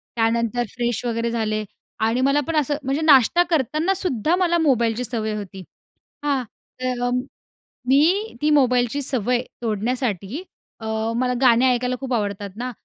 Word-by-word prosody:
त्यानंतर 230 +1 +1
फ्रेश 240 0 -2
वगैरे 230 0 -1
झाले 215 -2 -1 0.4
आणि 235 +3 +1
मला 275 +2 +3
पण 330 - -2
असं 295 -1 +1
म्हणजे 275 +3 -1
नाश्ता 310 +3 +5
करतानासुद्धा 320 - +1
मला 345 -2 +2
मोबाईलची 240 -5 +1
सवय 220 -3 -3
होती. 195 -2 -7 0.6
हां. 275 -3 0 0.4
तर 245 -1 -1 0.8
मी 340 - +3
ती 300 - +2
मोबाईलची 250 -1 +2
सवय 250 -2 0 0.2
तोडण्यासाठी 230 - -2 0.4
अ, 220 - -8 0.3
मला 250 0 +1
गाणे 250 -1 +5
ऐकायला 250 +1 -1
खूप 265 -2 -4
आवडतात 205 -3 -2
ना, 250 +1 -4
250 Hz, 135 wpm, -22 LUFS, 230-285 Hz, 0.8 s, नाश्ता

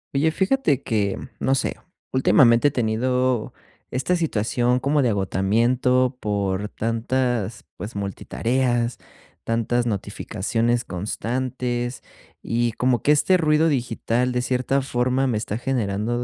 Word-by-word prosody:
Oye, 155 +3 +3
fíjate 190 - +1
que, 100 -4 -1 0.2
no 135 - +1
sé, 135 - 0 0.4
últimamente 130 0 +5
he - - -9
tenido 125 +1 0 0.4
esta 130 +8 0
situación 125 -5 +1
como 140 +2 +1
de 125 - +3
agotamiento 120 +6 +1
por 100 -2 -1
tantas, 115 -1 -1
pues, 105 +2 -7
multitareas, 120 +5 -1 0.5
tantas 115 +1 0
notificaciones 115 +2 -1
constantes. 120 +5 -3 0.4
Y 120 0 0
como 125 +2 0
que 145 - +4
este 165 +5 +4
ruido 155 -1 +3
digital, 125 -2 0
de 125 0 0
cierta 130 +2 0
forma, 130 0 0
me 115 - 0
está 105 +1 -3
generando 120 -1 -1
120 Hz, 120 wpm, -23 LUFS, 110-130 Hz, 0.5 s, últimamente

